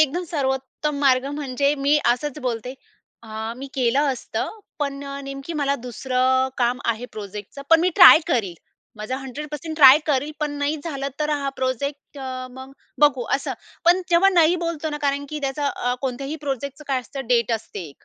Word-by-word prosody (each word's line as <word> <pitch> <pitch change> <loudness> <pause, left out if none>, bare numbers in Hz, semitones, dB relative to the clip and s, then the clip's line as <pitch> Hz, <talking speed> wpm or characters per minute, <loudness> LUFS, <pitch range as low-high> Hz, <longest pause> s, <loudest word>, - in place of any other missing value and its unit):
एकदम 310 +4 +2
सर्वोत्तम 280 -1 -2
मार्ग 260 -2 +4
म्हणजे 280 0 0
मी 285 +1 +2
असंच 255 +4 0
बोलते, 245 -1 -3 0.5
"हं, 220 +1 -5
मी 275 - -6
केलं 255 +1 +2
असतं. 250 - -4 0.3
पण 280 -1 -3
अ, 280 0 -6
नेमकी 275 +3 -7
मला 285 -3 0
दुसरं 255 +1 0
काम 245 0 +1
आहे 230 +2 -4
प्रोजेक्टचं. 210 +5 -8
पण 330 0 +7
मी 360 - +3
ट्राय 355 -4 +10
करील. 220 - 0 0.4
माझा 215 +5 -4
100% 300 +4 -6
ट्राय 280 -1 +9
करील. 290 0 +1
पण 300 -1 0
नाही 285 +2 0
झालं 275 -4 -3
तर 300 0 0
हा 285 -2 -1
प्रोजेक्ट 280 +3 -3
अ, 255 -1 -5
मग 260 +1 -11 0.3
बघू," 275 -5 +4
असं. 275 - -2 0.3
पण 350 +2 +5
जेव्हा 345 +3 +5
नाही 350 -2 +4
बोलतो 320 -2 -3
ना, 295 - -4
कारण 285 0 0
की 305 - -4
त्याचा 280 +1 -2
अ, 245 -2 -2
कोणत्याही 270 +3 -3
प्रोजेक्टचं 280 +2 -4
अ, - - -42
काय 265 -2 +1
असतं 270 +1 -8
डेट 235 -1 +2
असते, 205 -7 -5
275 Hz, 175 wpm, -23 LUFS, 255-295 Hz, 0.5 s, ट्राय